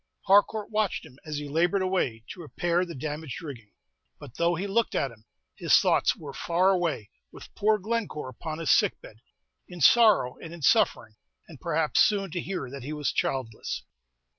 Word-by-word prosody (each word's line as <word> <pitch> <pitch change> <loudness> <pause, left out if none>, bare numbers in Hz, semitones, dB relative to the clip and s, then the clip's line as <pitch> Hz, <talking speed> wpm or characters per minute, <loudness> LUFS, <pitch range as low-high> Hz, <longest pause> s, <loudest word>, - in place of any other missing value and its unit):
Harcourt 205 +2 +3
watched 215 -5 -1
him, 135 -3 -16
as 150 -1 -3
he 145 0 -5
labored 175 +6 +1
away 135 -12 -1
to 180 - -8
repair 175 +2 -1
the 170 - -8
damaged 150 0 -5
rigging; 135 -11 -9 0.5
but 140 -5 -12
though 170 +1 +2
he 180 +4 -3
looked 215 +3 0
at 135 - 0
him, 110 -1 -19 0.3
his - - +4
thoughts - - +2
were 145 -3 -9
far 180 +6 +2
away 170 - -1 0.2
with - - -13
poor 215 +1 +2
Glencore 210 - -3
upon 155 +5 -6
his 165 -2 0
sick - - +3
bed, 110 - -14 0.5
in 180 -1 -10
sorrow 215 - +5
and 165 +1 -9
in 165 - -12
suffering, 110 -4 +2 0.3
and 155 -5 -14
perhaps 160 -2 0
soon 195 -4 +3
to 175 +1 -3
hear 185 -8 -4
that 140 0 -7
he 145 +5 -6
was 150 -2 -1
childless. 125 -5 -3
165 Hz, 185 wpm, -27 LUFS, 140-190 Hz, 0.5 s, sorrow